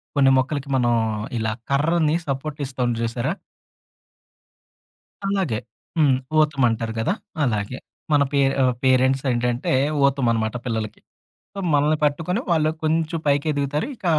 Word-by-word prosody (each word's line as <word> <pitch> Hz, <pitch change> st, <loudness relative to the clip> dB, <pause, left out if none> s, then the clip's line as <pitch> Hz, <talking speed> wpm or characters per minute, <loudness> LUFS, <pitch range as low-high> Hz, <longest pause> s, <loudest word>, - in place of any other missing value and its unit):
కొన్ని 135 Hz, -1 st, +5 dB
మొక్కలకి 140 Hz, +1 st, -1 dB
మనం 120 Hz, -2 st, +2 dB, 0.4 s
ఇలా 110 Hz, 0 st, -1 dB, 0.2 s
కర్రని 155 Hz, +2 st, +2 dB
సపోర్ట్ 140 Hz, +2 st, -3 dB
ఇస్తాం 125 Hz, -2 st, -1 dB
చూసారా? 120 Hz, +7 st, -1 dB, 1.9 s
అలాగే. 190 Hz, -, 0 dB, 0.4 s
హ్మ్. 145 Hz, -5 st, +4 dB, 0.2 s
ఊతమంటారు 120 Hz, -7 st, +1 dB
గదా! 145 Hz, -, +1 dB, 0.3 s
అలాగే. 110 Hz, 0 st, -1 dB, 0.3 s
మన 145 Hz, -1 st, +5 dB
పే 140 Hz, -, +1 dB, 0.2 s
ఆహ్, 130 Hz, -1 st, +3 dB
పేరెంట్స్ 130 Hz, +1 st, +3 dB
ఏంటంటే 120 Hz, +1 st, 0 dB, 0.3 s
ఊతమన్నమాట 115 Hz, -5 st, +1 dB
పిల్లలకి. 110 Hz, -3 st, -3 dB, 0.6 s
ఆహ్, 185 Hz, -, -2 dB
మనల్ని 150 Hz, +2 st, +3 dB
పట్టుకొని 165 Hz, +8 st, 0 dB
వాళ్ళు 155 Hz, -2 st, +3 dB
కొంచెం 160 Hz, +1 st, 0 dB
పైకెదుగుతారు 145 Hz, -, 0 dB
ఇంక 205 Hz, -, -12 dB
140 Hz, 115 wpm, -22 LUFS, 120-155 Hz, 1.9 s, కొన్ని